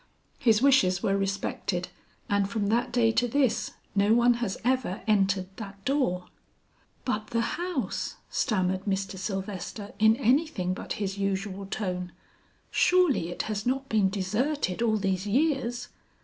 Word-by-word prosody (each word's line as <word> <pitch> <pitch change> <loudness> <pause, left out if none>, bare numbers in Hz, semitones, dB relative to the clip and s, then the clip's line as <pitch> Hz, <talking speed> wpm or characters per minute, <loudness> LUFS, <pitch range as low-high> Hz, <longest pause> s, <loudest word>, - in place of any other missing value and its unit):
His 225 0 +3
wishes 195 -10 +4
were 195 - +2
respected, 195 -2 -2 0.4
and 200 -1 +1
from 205 -2 -1
that 235 +3 +1
day 235 -2 +3
to 245 +2 +2
this 255 -2 +1 0.2
no 205 +2 +4
one 240 +1 +5
has 210 -5 -1
ever 245 -6 0
entered 195 -3 +2
that 200 -3 -9
door." 250 -10 +1 0.8
"But 215 -4 -1
the 230 +1 0 0.2
house!" 315 - -2
stammered 190 -3 0
Mr. 195 -1 -1
Sylvester 195 +1 -5
in 220 +1 +6
anything 245 - +1
but - - -5
his 200 -1 -3
usual 195 0 -2
tone, 180 -3 -3 0.6
"surely 355 - +3
it 175 - -3
has 215 0 -3
not 270 +2 0
been 210 -3 +3
deserted 210 +3 -1
all 220 -2 +2
these 195 -1 -1
years!" 250 -1 0
210 Hz, 140 wpm, -28 LUFS, 195-245 Hz, 0.8 s, in